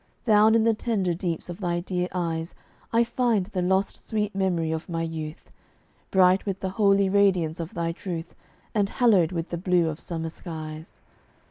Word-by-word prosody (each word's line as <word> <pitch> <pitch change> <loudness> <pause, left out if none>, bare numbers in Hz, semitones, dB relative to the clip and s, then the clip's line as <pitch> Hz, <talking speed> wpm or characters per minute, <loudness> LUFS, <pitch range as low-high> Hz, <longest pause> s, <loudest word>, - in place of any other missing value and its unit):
Down 215 0 +5
in 225 - +4
the 225 0 +4
tender 210 -5 -1
deeps 170 -1 -3
of 175 +1 -7
thy 175 -3 -1
dear 180 0 -2
eyes 165 -2 -3 0.4
I 230 +1 +4
find 235 -4 +1
the 185 -1 -3
lost 190 +2 0
sweet 210 -1 -1
memory 180 -4 0
of 160 +3 -4
my 165 -1 -2
youth, 160 -1 -6 0.6
Bright 185 0 +4
with 195 -2 -3
the 190 - -2
holy 200 -1 +3
radiance 190 -5 +2
of 165 0 -6
thy 170 -1 -1
truth, 170 -1 -6 0.4
And 205 -2 +1
hallowed 200 -10 +3
with 170 -1 -3
the 170 - -3
blue 180 -2 +2
of 155 0 -5
summer 165 -1 -4
skies. 155 -1 -8
180 Hz, 175 wpm, -26 LUFS, 165-200 Hz, 0.6 s, Down